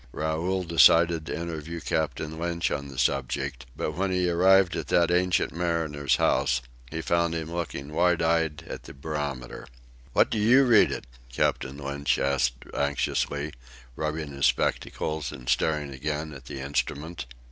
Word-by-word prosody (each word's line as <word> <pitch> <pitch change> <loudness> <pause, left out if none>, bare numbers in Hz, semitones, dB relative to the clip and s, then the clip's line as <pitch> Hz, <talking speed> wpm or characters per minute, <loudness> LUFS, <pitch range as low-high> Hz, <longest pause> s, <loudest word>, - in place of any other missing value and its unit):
Raoul 85 +5 -1
decided 85 -1 +5
to - - -3
interview 85 0 -5
Captain 80 0 -2
Lynch 85 -1 -1
on 70 - -3
the 70 -1 -10
subject, 65 0 -1
but - - -2
when 95 +5 -1
he 90 -1 +1
arrived 95 +1 +4
at - - -4
that 85 0 +3
ancient 90 0 +2
mariner's 80 -5 0
house, - - +2 0.3
he 80 +4 -4
found 85 0 +1
him 80 0 -4
looking 75 -4 -4
wide 90 +1 +3
eyed 80 -1 +1
at - - -7
the - - -11
barometer. 70 -4 -5 0.5
"What - - +4
do 110 - 0
you 120 +6 +6
read 120 -4 +5
it?" - - -5 0.3
Captain 65 +3 0
Lynch 70 0 -1
asked 70 -3 0
anxiously, 70 +1 -1 0.4
rubbing 75 0 -3
his 70 0 +2
spectacles 75 -3 -1
and 60 0 -10
staring 70 +2 +1
again 75 +3 -3
at 70 - -11
the 70 - -7
instrument. 75 +2 -3
80 Hz, 155 wpm, -27 LUFS, 70-85 Hz, 0.5 s, you